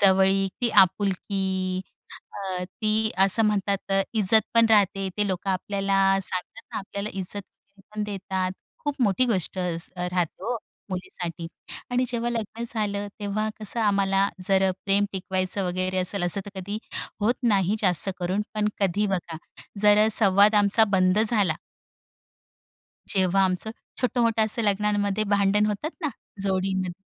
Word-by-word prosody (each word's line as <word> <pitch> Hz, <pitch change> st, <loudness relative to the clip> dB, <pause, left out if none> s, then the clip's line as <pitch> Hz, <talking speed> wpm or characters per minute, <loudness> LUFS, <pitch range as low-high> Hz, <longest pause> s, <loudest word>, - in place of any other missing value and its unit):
जवळीक 195 Hz, 0 st, +4 dB
ती 235 Hz, -, +2 dB
आपुलकी 190 Hz, -1 st, +1 dB, 0.6 s
अ, 185 Hz, -2 st, -3 dB
ती 215 Hz, +3 st, -1 dB
असं 195 Hz, +4 st, +4 dB
म्हणतात 200 Hz, -1 st, -1 dB, 0.2 s
इज्जत 220 Hz, +1 st, +5 dB
पण 230 Hz, 0 st, +6 dB
राहते 195 Hz, -2 st, +3 dB
ते 210 Hz, -1 st, +1 dB
लोक 185 Hz, +1 st, -3 dB
आपल्याला 195 Hz, +1 st, -1 dB, 0.3 s
सांगतात 185 Hz, +4 st, -3 dB
ना, -, -, -2 dB
आपल्याला 200 Hz, +1 st, -5 dB
इज्जत 190 Hz, +1 st, -4 dB
वगैरे 200 Hz, +1 st, -29 dB
पण 215 Hz, -, -2 dB
देतात 190 Hz, -2 st, -3 dB, 0.3 s
खूप 290 Hz, -1 st, -1 dB
मोठी 225 Hz, +3 st, +3 dB
गोष्ट 190 Hz, -4 st, -1 dB
असते 180 Hz, 0 st, -3 dB
राहते 180 Hz, -2 st, -2 dB
हो 245 Hz, +1 st, -1 dB, 0.3 s
मुलीसाठी 175 Hz, -2 st, -5 dB, 0.4 s
आणि 250 Hz, +1 st, +1 dB
जेव्हा 240 Hz, 0 st, -2 dB
लग्न 230 Hz, 0 st, -4 dB
झालं 205 Hz, -3 st, -2 dB
तेव्हा 210 Hz, +1 st, -1 dB
कसं 215 Hz, +3 st, -1 dB
आम्हाला 195 Hz, -2 st, +2 dB, 0.2 s
जर 190 Hz, -1 st, +3 dB
प्रेम 200 Hz, +1 st, +3 dB
टिकवायचं 190 Hz, 0 st, -1 dB
वगैरे 185 Hz, +1 st, -1 dB
असेल 185 Hz, +1 st, 0 dB
असं 175 Hz, +3 st, +2 dB
तर 200 Hz, -1 st, -9 dB
कधी 200 Hz, +3 st, -4 dB, 0.4 s
होत 230 Hz, +4 st, +2 dB, 0.2 s
नाही 195 Hz, +2 st, +1 dB
जास्त 180 Hz, -2 st, +3 dB
करून 185 Hz, +4 st, 0 dB
पण 210 Hz, 0 st, +1 dB
कधी 200 Hz, +2 st, +1 dB
बघा 175 Hz, -4 st, -3 dB, 0.5 s
जर 210 Hz, 0 st, +6 dB
अ, -, -, +3 dB
संवाद 205 Hz, 0 st, +6 dB
आमचा 205 Hz, +2 st, +5 dB
बंद 185 Hz, +1 st, +3 dB
झाला. 200 Hz, -8 st, +2 dB, 1.5 s
जेव्हा 190 Hz, 0 st, +2 dB
आमचं 185 Hz, +4 st, -1 dB, 0.3 s
छोटं-मोठं 230 Hz, -2 st, +2 dB
असं 220 Hz, +2 st, +1 dB
लग्नांमध्ये 205 Hz, 0 st, +1 dB
भांडण 205 Hz, +1 st, +3 dB
होतात 215 Hz, +9 st, -2 dB
ना 310 Hz, -, 0 dB, 0.3 s
जोडीमध्ये. 190 Hz, -1 st, -1 dB
195 Hz, 140 wpm, -25 LUFS, 185-210 Hz, 1.5 s, पण